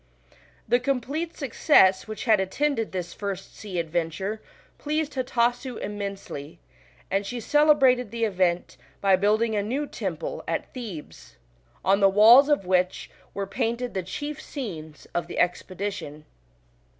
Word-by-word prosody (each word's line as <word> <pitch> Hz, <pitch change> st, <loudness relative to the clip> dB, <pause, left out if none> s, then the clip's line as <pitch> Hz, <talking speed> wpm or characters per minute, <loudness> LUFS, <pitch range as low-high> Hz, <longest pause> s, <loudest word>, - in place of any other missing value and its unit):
The 245 Hz, -, +3 dB
complete 275 Hz, +6 st, -2 dB
success 225 Hz, -, +4 dB
which 215 Hz, 0 st, -6 dB
had 220 Hz, -4 st, +4 dB
attended 225 Hz, +5 st, -1 dB
this 175 Hz, -2 st, -4 dB
first 195 Hz, -2 st, -6 dB
sea 200 Hz, -4 st, -6 dB
adventure 170 Hz, +5 st, -2 dB, 0.4 s
pleased 305 Hz, 0 st, -2 dB
Hatasu 245 Hz, -1 st, 0 dB
immensely, 200 Hz, -7 st, -6 dB, 0.5 s
and 195 Hz, +1 st, +1 dB
she 240 Hz, +5 st, -5 dB
celebrated 270 Hz, -3 st, +4 dB
the 230 Hz, +1 st, -3 dB
event 185 Hz, -4 st, 0 dB, 0.2 s
by 195 Hz, -1 st, +4 dB
building 215 Hz, +3 st, +2 dB
a 205 Hz, -, +1 dB
new 255 Hz, +8 st, -2 dB
temple -, -, -5 dB
at -, -, -3 dB
Thebes, 215 Hz, -, -9 dB, 0.5 s
on 195 Hz, +1 st, +4 dB
the 195 Hz, -1 st, +6 dB
walls 230 Hz, +8 st, +8 dB
of 290 Hz, -10 st, +2 dB
which 180 Hz, 0 st, 0 dB, 0.2 s
were 200 Hz, -, -2 dB
painted 235 Hz, +3 st, -2 dB
the 190 Hz, -, -1 dB
chief 290 Hz, -, -5 dB
scenes 160 Hz, -, -7 dB
of 175 Hz, -, -1 dB
the -, -, -7 dB
expedition. 180 Hz, -4 st, -2 dB
210 Hz, 135 wpm, -25 LUFS, 190-255 Hz, 0.5 s, walls